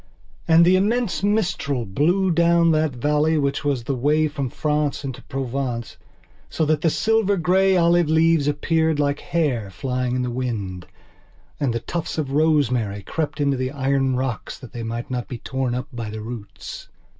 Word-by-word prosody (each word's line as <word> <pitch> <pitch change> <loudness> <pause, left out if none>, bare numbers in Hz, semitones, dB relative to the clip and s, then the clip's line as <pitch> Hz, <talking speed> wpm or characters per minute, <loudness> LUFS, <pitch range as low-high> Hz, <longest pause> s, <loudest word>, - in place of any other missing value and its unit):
And 165 0 +6
the 185 +1 +5
immense 225 +2 0
mistral 180 - 0
blew 175 - +1
down 170 0 +4
that 155 -3 +1
valley 150 +5 +1
which 140 0 0
was 140 -5 0
the 135 - -2
way 150 +5 +2
from 140 -3 -3
France 150 +1 -1
into 130 -3 -5
Provence 130 -3 -4 0.5
so 160 - 0
that 155 0 +1
the 165 - +3
silver 215 +2 +2
grey 185 +3 +3
olive 170 -1 +3
leaves 160 -2 +3
appeared 160 +1 +1
like 145 0 +1
hair 135 -11 -1
flying 125 +5 -2
in 125 - 0
the 125 - -2
wind, 105 -8 -4 0.7
and 140 -4 +1
the 115 - -1
tufts 170 +3 -4
of 145 -4 -2
rosemary 130 -9 +1
crept 155 - -3
into 140 -2 +1
the 130 0 -1
iron 135 -1 0
rocks 125 -4 -3
that 125 - -12
they 120 - -5
might 115 +4 -5
not 125 -1 -3
be 125 - -6
torn 130 0 -2
up 125 +1 -4
by 115 -3 -5
the 110 0 -6
roots. 110 -2 -8
145 Hz, 175 wpm, -22 LUFS, 125-160 Hz, 0.7 s, And